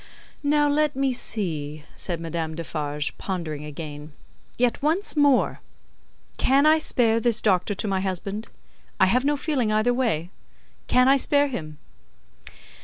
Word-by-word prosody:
"Now, 295 0 +3
let 295 0 +1
me 270 -1 +1
see," 155 -11 -3
said 175 -3 -4
Madame 165 -1 -4
Defarge, 150 -3 -2
pondering 165 -6 -4
again. 150 0 -8 0.4
"Yet 245 -1 +1
once 325 +8 0
more! 285 -3 +3 0.8
Can 275 +2 +4
I 310 +1 +5
spare 230 -6 +2
this 235 0 +2
Doctor 195 0 +1
to 210 - -3
my 190 -1 0
husband? 195 +3 -4 0.5
I - - +6
have 250 +8 +2
no 290 0 +2
feeling 270 -7 0
either 215 +3 +2
way. 205 -10 -1 0.6
Can 250 +1 +4
I 275 +1 +6
spare 285 +1 +2
him?" 155 - -6
215 Hz, 140 wpm, -24 LUFS, 165-275 Hz, 0.8 s, I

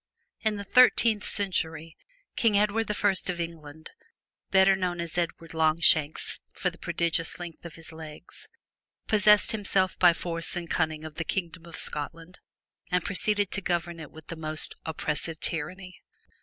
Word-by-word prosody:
In 220 -1 0
the 200 - -5
thirteenth 230 -1 +5
century, 165 -5 -1 0.4
King 220 -3 +3
Edward 210 +2 +1
I 205 0 +2 0.2
of 175 -1 -2
England, 160 -2 -7 0.6
better 190 0 +5
known 180 -2 -2
as 170 -1 -4
Edward 170 -1 -3
Longshanks 155 -1 +3
from - - -1
the - - -17
prodigious 165 -1 -1
length 175 -1 -9
of 170 - -8
his 165 0 -8
legs, 160 - -11 0.6
possessed 210 -1 +5
himself 195 -3 +1
by 175 -2 +7
force 165 0 -2
and 175 -1 -4
cunning 155 -2 -1
of 155 -1 -9
the 165 - -1
Kingdom 170 -1 -4
of 170 - -9
Scotland 165 +4 -5 0.5
and 180 -1 +1
proceeded 205 0 +1
to 195 - -2
govern 175 -2 -2
it 150 -3 -8
with 160 -1 -14
the - - -7
most 155 -1 -2
oppressive 160 0 -2
tyranny. 180 +4 -4
170 Hz, 155 wpm, -28 LUFS, 160-195 Hz, 0.6 s, by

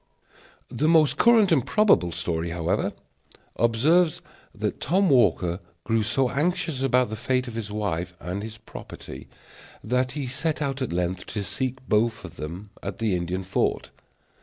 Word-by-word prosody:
The 155 - 0
most 160 -3 +4
current 225 -5 +5
and 140 -7 +4
probable 205 - +3
story, 85 0 -2
however, 85 -1 -1 0.6
observes 150 +9 +3 0.3
that - - -3
Tom 185 +3 +2
Walker 90 -8 +3 0.2
grew 115 -1 +1
so 125 +4 +1
anxious 160 -1 -1
about 125 -3 +2
the - - -2
fate 125 +3 -1
of 120 - -6
his 110 -2 -4
wife 90 -4 -2
and 90 +3 -4
his 110 +1 -7
property - - -10 0.6
that 125 +2 0
he 145 -2 -3
set 140 +5 -1
out 140 -2 -2
at 130 - -2
length 90 +1 -2
to 105 - -3
seek 130 +5 -2
them 130 0 -23
both 105 -7 0 0.4
at 100 - -5
the 110 -4 0
Indian 90 +2 -2
fort. 95 - -1
115 Hz, 155 wpm, -25 LUFS, 95-140 Hz, 0.6 s, current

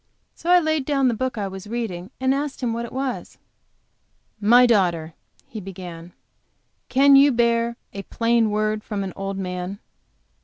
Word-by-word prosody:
So 335 - -6
I 360 0 +7
laid 315 -4 0
down 275 -3 +2
the - - 0
book 255 +1 -3
I 200 -2 -2
was 190 +1 -8
reading, 210 -6 -4
and 260 0 +2
asked 280 0 -3
him 235 -2 0
what 235 +1 -3
it - - -10
was. 265 -1 -4 1.0
"My 240 +4 +6
daughter," 175 -8 +1 0.3
he 220 - -8
began, 180 -2 -9 0.8
"can 275 +1 +6
you 280 +1 +7
bear 235 -1 +1 0.2
a 200 - -5
plain 230 +1 +1
word 215 0 -1
from 205 -2 -4
an 190 -2 -5
old 195 0 -4
man?" 180 0 -4
230 Hz, 165 wpm, -23 LUFS, 195-260 Hz, 1.0 s, I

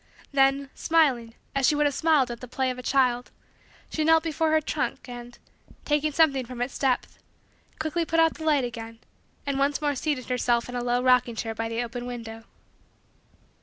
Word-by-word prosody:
Then, 275 0 +2
smiling 260 -8 +1 0.2
as 275 -2 +2
she 300 - +3
would 295 0 +2
have 290 - +2
smiled 295 -5 +3
at 235 - -6
the 250 - -7
play 260 +1 -1
of 250 - -7
a - - -5
child, 250 -1 +1 0.6
she 315 - -1
knelt 320 0 +5
before 320 0 0
her 315 0 +4
trunk 310 - -3
and, 240 -1 -9 0.5
taking 300 +1 +1
something 280 -4 +3
from 250 0 -9
its 245 +2 -3
depth, 265 -3 0 0.6
quickly 315 +2 -1
put 330 0 0
out 325 0 +4
the 320 - -9
light 300 -4 +3
again 230 -1 -6 0.5
and 280 -1 -1
once 280 +1 +1
more 295 -1 0
seated 280 -1 -2
herself 240 -1 +1
in 245 - -7
a 245 - -2
low 245 0 +1
rocking 250 -2 +3
chair 225 0 -3
by 225 +1 -3
the 230 +1 -1
open 240 +1 -6
window. 225 -2 -7
260 Hz, 195 wpm, -26 LUFS, 245-295 Hz, 0.6 s, knelt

